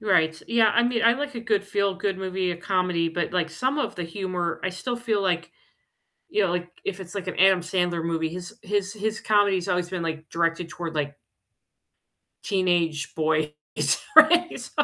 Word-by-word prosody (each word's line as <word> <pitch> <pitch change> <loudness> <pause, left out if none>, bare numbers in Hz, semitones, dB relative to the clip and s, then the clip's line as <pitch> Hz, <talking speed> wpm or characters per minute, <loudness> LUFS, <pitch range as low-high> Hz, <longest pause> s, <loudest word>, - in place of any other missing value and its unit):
Right, 165 -7 +2
yeah, 225 -2 +4
I 235 - +3
mean, 240 -1 +1
I 230 - +7
like 285 +2 -4
a 235 - -4
good 215 -3 0
feel-good 200 -1 -1
movie, 190 -1 -1
a 175 - -3
comedy, 180 -2 0
but, 165 0 -2
like, 175 -3 +1
some 260 - -1
of - - -1
the 180 - -4
humor, 175 0 -3
I 185 - -1
still 240 +7 -4
feel, 225 -4 -1
like, 175 -3 -1 0.8
you 210 -9 +2
know, 190 - +1
like, 175 0 -2 0.2
if 195 -1 -3
it's, 180 -2 -10
like, 195 -2 -5
an 185 - -4
Adam 190 0 +6
Sandler 175 -1 -1
movie, 165 -1 -1
his 180 +5 -8
his 200 -1 -1
his 215 0 -2
comedy's 200 -4 +2
always 180 -1 0
been, 185 -1 -3
like, 160 -1 -4
directed 165 0 -1
toward, 170 -2 -6
like 145 -1 -2 1.3
teenage 175 -6 0
boys, 155 -1 +1 0.7
right? 340 0 +6
So, 245 - -9
185 Hz, 185 wpm, -25 LUFS, 170-205 Hz, 1.3 s, I